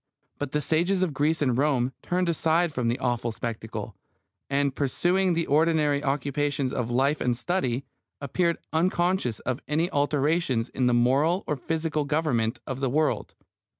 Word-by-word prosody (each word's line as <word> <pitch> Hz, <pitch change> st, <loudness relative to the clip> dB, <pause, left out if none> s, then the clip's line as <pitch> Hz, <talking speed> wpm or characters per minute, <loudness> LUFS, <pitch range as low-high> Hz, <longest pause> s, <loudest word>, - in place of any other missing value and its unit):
But 145 Hz, -2 st, -3 dB
the 150 Hz, -, 0 dB
sages 175 Hz, +5 st, +2 dB
of 170 Hz, -5 st, -1 dB
Greece 150 Hz, +3 st, +1 dB
and 130 Hz, -4 st, +1 dB
Rome 130 Hz, -2 st, +1 dB
turned 180 Hz, 0 st, 0 dB
aside 165 Hz, 0 st, +1 dB
from 125 Hz, -3 st, -1 dB
the 120 Hz, +2 st, +1 dB
awful 120 Hz, -2 st, -1 dB
spectacle, 110 Hz, -2 st, -5 dB, 0.5 s
and 140 Hz, 0 st, +1 dB
pursuing 175 Hz, +6 st, +1 dB
the 165 Hz, 0 st, 0 dB
ordinary 150 Hz, -1 st, +2 dB
occupations 140 Hz, 0 st, -1 dB
of 125 Hz, -3 st, -2 dB
life 135 Hz, +5 st, +1 dB
and 125 Hz, -1 st, +1 dB
study, 135 Hz, -5 st, -1 dB, 0.3 s
appeared 170 Hz, +4 st, 0 dB, 0.2 s
unconscious 175 Hz, -, +1 dB
of 130 Hz, +2 st, -3 dB
any 160 Hz, +4 st, 0 dB
alterations 145 Hz, -3 st, +1 dB
in 130 Hz, -1 st, 0 dB
the 120 Hz, -, +3 dB
moral 140 Hz, +10 st, +2 dB
or 150 Hz, -, -1 dB
physical 155 Hz, +2 st, -2 dB
government 130 Hz, -6 st, 0 dB
of 130 Hz, 0 st, -4 dB
the 135 Hz, -2 st, 0 dB
world. 150 Hz, +3 st, 0 dB
145 Hz, 155 wpm, -26 LUFS, 125-165 Hz, 0.5 s, the